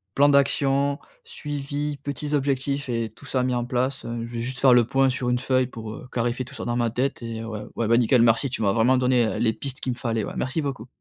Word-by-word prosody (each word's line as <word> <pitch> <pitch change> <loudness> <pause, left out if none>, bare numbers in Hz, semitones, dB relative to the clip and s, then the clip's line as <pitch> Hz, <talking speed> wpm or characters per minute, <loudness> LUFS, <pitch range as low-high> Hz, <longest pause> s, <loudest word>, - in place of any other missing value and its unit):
plan 140 +1 +5
d'action, 140 0 +2 0.3
suivi, 145 - -4
petits 145 +1 -3
objectifs 140 0 0
et 115 -2 -1
tout 110 - -15
ça 130 -1 0
mis 125 0 0
en 120 -1 -1
place, 125 +2 -1
heu, 115 -1 -4
je 120 - -10
vais 115 - -3
juste 125 +2 -3
faire 130 -2 +6
le 120 -1 +6
point 135 +3 +2
sur 125 -1 -1
une 125 - +2
feuille 130 0 +1
pour, 115 -3 -8
heu, 125 - -10
clarifier 120 +1 -1
tout 125 - -11
ça - - -5
dans 120 - -1
ma 120 -1 +1
tête. 130 +4 -2
Et 115 -1 -5
ouais, 110 -2 -5
ouais, 115 - -1
bah, 115 +1 +4
nickel, 120 0 +4
merci, 115 +4 +3
tu 120 - -3
m'as 100 -1 +3
vraiment 120 +3 +4
donné, 125 -1 +3
heu, - - -3
les 110 -1 +2
pistes 135 +1 -5
qu'il 130 - -2
me - - -10
fallait, 115 -4 -1
ouais, - - -5
merci 130 +5 -1
beaucoup. 130 -5 -4
125 Hz, 260 wpm, -24 LUFS, 115-140 Hz, 0.3 s, faire